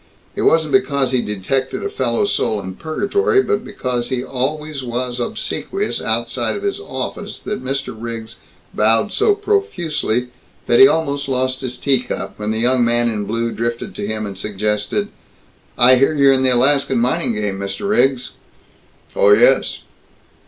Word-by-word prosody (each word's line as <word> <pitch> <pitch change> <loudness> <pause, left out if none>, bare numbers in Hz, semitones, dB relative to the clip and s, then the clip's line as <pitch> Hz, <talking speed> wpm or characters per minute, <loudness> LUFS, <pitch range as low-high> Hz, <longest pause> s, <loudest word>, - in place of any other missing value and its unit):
It - - -2
wasn't 160 -2 +3
because 140 -9 +2
he 130 -2 +2
detected 130 +7 -2
a 410 - -2
fellow 425 0 0
soul 110 - 0
in 95 -1 -6
purgatory 395 - +1
but 420 0 -1
because 125 - -3
he 125 -1 -2
always 145 +3 -3
was 125 0 -3
obsequious 390 - -3
outside - - -1
of 405 - -6
his 400 0 -1
office 410 - -6
that 210 - -4
Mr. 135 -2 -3
Riggs 115 0 -7 0.3
bowed 115 - +2
so 420 -1 +3
profusely 175 - -1 0.4
that 120 - +3
he 200 - +10
almost 145 -5 -1
lost 130 0 -1
his 125 -2 -4
tea 135 -3 +2
cup, 95 -6 -6
when 105 0 -3
the 110 - -1
young 125 +2 +2
man 120 0 +2
in 105 -2 -3
blue 115 +2 -2
drifted 115 +1 -3
to 100 - -5
him 110 0 -3
and 100 -2 -7
suggested, 105 - -2 0.7
"I 125 +1 +7
hear 135 +4 +3
you're 140 -2 +5
in 130 - +1
the 130 - +4
Alaskan 135 +1 +3
mining 120 -1 0
game, 105 -2 -2
Mr. 100 - -4
Riggs." 135 - +2 0.8
"Oh - - +4
yes." - - +3
130 Hz, 165 wpm, -19 LUFS, 115-160 Hz, 0.8 s, he